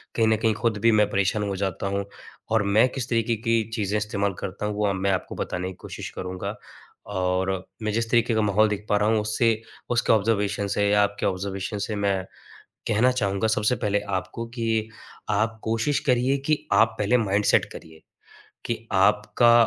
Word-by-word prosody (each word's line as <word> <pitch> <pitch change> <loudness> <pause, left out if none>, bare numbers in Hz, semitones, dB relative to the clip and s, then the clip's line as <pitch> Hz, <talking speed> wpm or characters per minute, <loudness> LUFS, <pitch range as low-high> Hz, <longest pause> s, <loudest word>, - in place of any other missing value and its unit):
कहीं 115 -1 +3
न 110 0 +3
कहीं 110 0 +2
ख़ुद 115 -3 +1
भी 115 - +7
मैं 105 -1 +3
परेशान 100 +1 +1
हो 100 - -2
जाता 95 0 -2
हूँ 100 0 -1 0.5
और 110 -2 +3
मैं 105 +5 +4
किस 125 -1 -5
तरीके 115 0 +1
की 115 -1 +3
चीज़ें 105 -2 0
इस्तेमाल 100 -1 -1
करता 100 +2 -5
हूँ 105 0 -2
वो 105 0 0
अब 100 - -1
मैं 100 0 +2
आपको 95 -1 -2
बताने 90 +1 -3
की - - -7
कोशिश - - -6
करूँगा। 90 0 -4 0.5
और 95 -1 0 0.3
मैं 110 - 0
जिस 115 0 -1
तरीके 120 0 +3
का 110 - +2
माहौल 105 +1 +3
देख 105 0 -4
पा 105 - +3
रहा 105 +1 +2
हूँ 110 -1 +3
उससे 110 +1 +1 0.3
उसके 120 -1 +3
ऑब्ज़र्वेशन 105 -2 +1
से 100 0 +1
या 105 0 +4
आपके 100 0 -2
ऑब्ज़र्वेशन 95 +2 -2
से 110 - -3
मैं 100 -2 0 0.7
कहना 110 +4 +3
चाहूँगा 100 -3 0
सबसे 110 +2 +2
पहले 105 -1 0 0.2
आपको 115 +5 -6
कि 115 -1 0 0.4
आप 110 +2 0
कोशिश 115 +6 +1
करिए 130 +1 +3
कि 155 -1 0
आप 110 0 +4
पहले 105 +4 +3
माइंडसेट 105 -3 +2
करिए। 80 -1 -12 0.6
कि 120 - -1 0.2
आपका 105 +4 +4
105 Hz, 190 wpm, -25 LUFS, 100-115 Hz, 0.7 s, भी